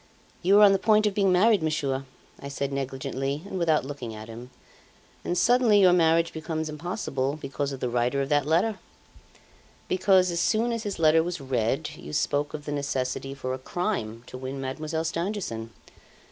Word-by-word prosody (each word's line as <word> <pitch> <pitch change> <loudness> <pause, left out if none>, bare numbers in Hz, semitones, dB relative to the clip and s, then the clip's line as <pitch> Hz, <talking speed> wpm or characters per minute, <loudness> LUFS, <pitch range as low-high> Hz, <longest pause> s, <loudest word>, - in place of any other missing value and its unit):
'You 190 +3 +4
were 210 - +8
on 205 - +8
the 195 - +1
point 215 +1 +4
of 210 - +1
being 195 -1 +2
married, 200 +2 +4
Monsieur,' 140 -4 -1 0.3
I 140 - -7
said 140 0 -3
negligently 135 +2 -3
and 190 -2 -5
without 160 -5 +2
looking 130 -6 -6
at 110 +1 -9
him, 120 +2 -9 0.7
'and 175 - -2
suddenly 235 +1 +4
your 185 -2 +6
marriage 165 -1 +3
becomes 160 -1 -4
impossible 150 -4 -3
because 140 0 -3
of 135 - -7
the - - 0
writer 120 +3 0
of 135 0 -1
that 145 -1 +2
letter; 190 +7 +1 1.1
because 185 -1 +3
as 170 - -1
soon 230 +5 +1
as 230 -1 -2
his 205 -3 -4
letter 160 0 +5
was 175 +1 -3
read, 130 +2 -1
you - - -9
spoke 145 0 0
of 150 -1 -8
the 145 - -4
necessity 135 -1 -2
for 130 -2 -4
a 130 - -5
crime 130 - -3
to 130 - -9
win 130 +1 -5
Mademoiselle 155 +4 -3
Stangerson. 170 - -3
155 Hz, 185 wpm, -26 LUFS, 135-185 Hz, 1.1 s, were